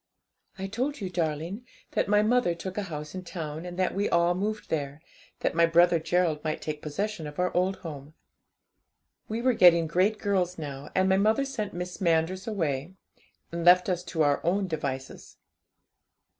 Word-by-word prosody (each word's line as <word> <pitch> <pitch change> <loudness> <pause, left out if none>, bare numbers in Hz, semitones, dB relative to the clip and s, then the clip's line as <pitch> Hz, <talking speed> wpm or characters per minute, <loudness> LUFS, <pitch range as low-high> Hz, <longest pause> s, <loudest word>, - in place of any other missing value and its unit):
'I 190 - -4
told 260 +7 -2
you, 190 -3 -4
darling, 170 +5 -2 0.3
that - - 0
my 210 +1 +4
mother 225 -6 +2
took 185 +2 -6
a 210 - -1
house 150 -1 -6
in 185 -1 -6
town, 165 -2 -6
and 175 0 -7
that 185 -1 +1
we 200 +2 0
all 170 +1 +3
moved 210 +4 -3
there, 145 -2 -2 0.4
that - - 0
my 170 0 +4
brother 170 0 +5
Gerald 165 -2 0
might 155 -1 -2
take 150 -1 -5
possession 170 +2 -3
of 150 - -10
our 180 0 0
old 185 +2 +2
home. 150 -1 -8 1.1
We 225 +2 -3
were 255 0 +4
getting 170 -5 +6
great 185 +7 +2
girls 185 -4 0
now, 145 -2 -6
and 185 0 +3
my 190 0 +4
mother 220 +7 +3
sent 215 -9 -4
Miss 180 +1 -5
Manders 170 +3 +1
away, 165 -5 -2 0.6
and 170 0 -3
left 180 +2 +6
us 180 -1 0
to 160 -3 0
our 145 -1 +2
own 190 +4 +1
devices. 135 -5 -5
175 Hz, 180 wpm, -27 LUFS, 160-195 Hz, 1.1 s, getting